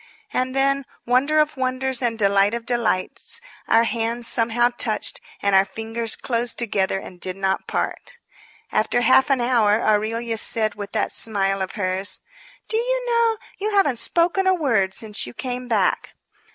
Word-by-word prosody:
And 255 +1 -1
then, 275 0 +1 0.2
wonder 260 +5 +2
of 305 0 +2
wonders 260 -1 -1
and 235 -2 -1
delight 200 +1 +3
of 235 -1 -6
delights! 235 - -1 0.3
our 225 +1 +4
hands 235 +1 -1
somehow 235 +1 +3
touched, 240 -3 -1 0.2
and 200 0 +2
our 190 - +6
fingers 225 +2 -2
closed 240 -1 -2
together 200 -5 0
and 180 -2 -10
did 185 -1 -4
not 190 -1 -1
part. - - -4 0.5
After 240 +3 +1
half 260 +3 +4
an 270 -3 +2
hour 225 -4 +3
Aurelia 225 +1 0
said, 215 -2 +1
with 205 -1 -8
that - - 0
smile 195 -3 +2
of 190 - -3
hers: 190 -1 0 0.5
"Do 440 - -1
you - - 0
know, 465 -2 +2 0.2
you 415 +1 -1
haven't 290 - +2
spoken 350 +6 +1
a 375 - +4
word 225 - +1
since 210 - -3
you 120 - -10
came 250 -1 -5
back!" 210 -6 0
235 Hz, 165 wpm, -22 LUFS, 210-265 Hz, 0.5 s, our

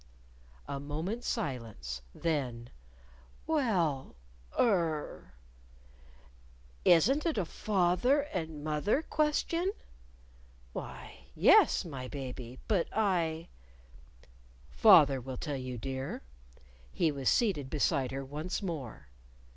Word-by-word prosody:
A 140 0 -4
moment's 160 - -4
silence. 115 - -4
Then, 130 -8 -2 0.7
"Well 190 - 0 0.4
er 165 - 0 0.7
" - - -26
"Isn't 265 - +2
it 330 -6 0
a 195 - +1
fath 180 -1 0
er 280 +4 +4
and 160 -4 -4
moth 150 +3 -2
er 275 +9 +3
question?" 330 +4 0 1.0
"Why, - - -8
yes, - - +5
my 135 -6 -6
baby. 130 -3 -7
But 200 -6 +2
I 170 -6 0 0.6
" - - -26 0.6
"Father 150 - +6
will 130 +1 -6
tell 145 +2 -3
you, 130 -1 -5
dear." 130 - -5 0.7
He 165 -3 +1
was 135 -3 0
seated 180 - +1
beside 140 -3 +1
her 135 +1 -5
once 155 +9 -4
more. 135 - -5
150 Hz, 105 wpm, -31 LUFS, 130-190 Hz, 1.0 s, Father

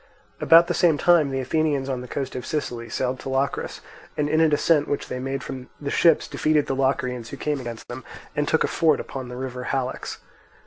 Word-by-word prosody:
About 165 +1 +7
the 175 - -1
same 165 -3 +3
time 165 -1 +4
the 135 0 -2
Athenians 145 0 0
on 130 -2 -2
the 125 - -8
coast 135 +1 -4
of 125 - -4
Sicily 120 -6 -3
sailed 130 +3 -2
to - - -6
Locris, 135 +1 -1 0.4
and 150 - +1
in 155 +2 +2
a 160 - +5
descent 150 0 +3
which 145 - -2
they 125 - -3
made 135 +1 -3
from 130 -2 -7
the 140 -1 -4
ships 165 -3 +4
defeated 155 -1 +1
the - - -2
Locrians 125 -3 -1
who 140 - -7
came 150 0 -1
against 120 -3 -7
them, 120 +1 -7 0.3
and 150 0 0
took 160 - +2
a - - +1
fort 155 -3 +2
upon 130 -2 -6
the 125 - -7
river 125 -1 -5
Halex. 130 -2 -3
135 Hz, 220 wpm, -24 LUFS, 130-150 Hz, 0.4 s, About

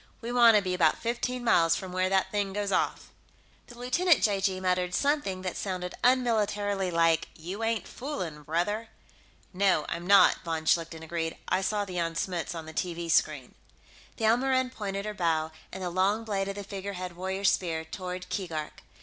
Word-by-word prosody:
We 235 +1 -5
want 235 -2 +7
to 205 - +4
be 185 -1 -1
about 165 -4 +3
fifteen 240 +1 -2
miles 165 -8 +4
from 190 -1 -6
where 185 0 +1
that 190 0 +1
thing 200 -2 -1
goes 205 0 -2
off." - - 0 0.6
The 240 - -13
lieutenant 300 +7 +3
(j.g.) 195 -2 +1
muttered 180 -1 0
something 280 -11 0
that 185 -2 -3
sounded 180 -2 -4
unmilitarily 210 -6 +2
like, 165 -1 +2
"You 185 +7 -6
ain't 225 -1 -1
foolin', 185 - -5
brother!" 190 +9 -1 0.6
"No, 185 -4 +2
I'm 170 +1 -4
not," 200 0 +7
von 160 -1 -3
Schlichten 165 0 +1
agreed. 165 0 -3
"I 185 - +2
saw 205 +1 0
the 185 -2 -6
Jan 165 -1 -1
Smuts 175 -1 -2
on 165 -1 -6
the 160 - -9
TV 170 0 -2
screen." - - +1 0.6
The 225 - -1
Elmoran 260 +3 +2
pointed 200 -4 -4
her 210 - -3
bow, 160 -4 0 0.2
and 190 - -6
the 180 - -2
long 195 +5 +1
blade 200 -3 -2
of 195 - -4
the 205 - -5
figurehead 190 -3 -6
warrior's 190 +2 +1
spear, 160 -3 -2
toward 180 +2 -6
Keegark. 165 -6 -4
190 Hz, 180 wpm, -28 LUFS, 170-210 Hz, 0.6 s, want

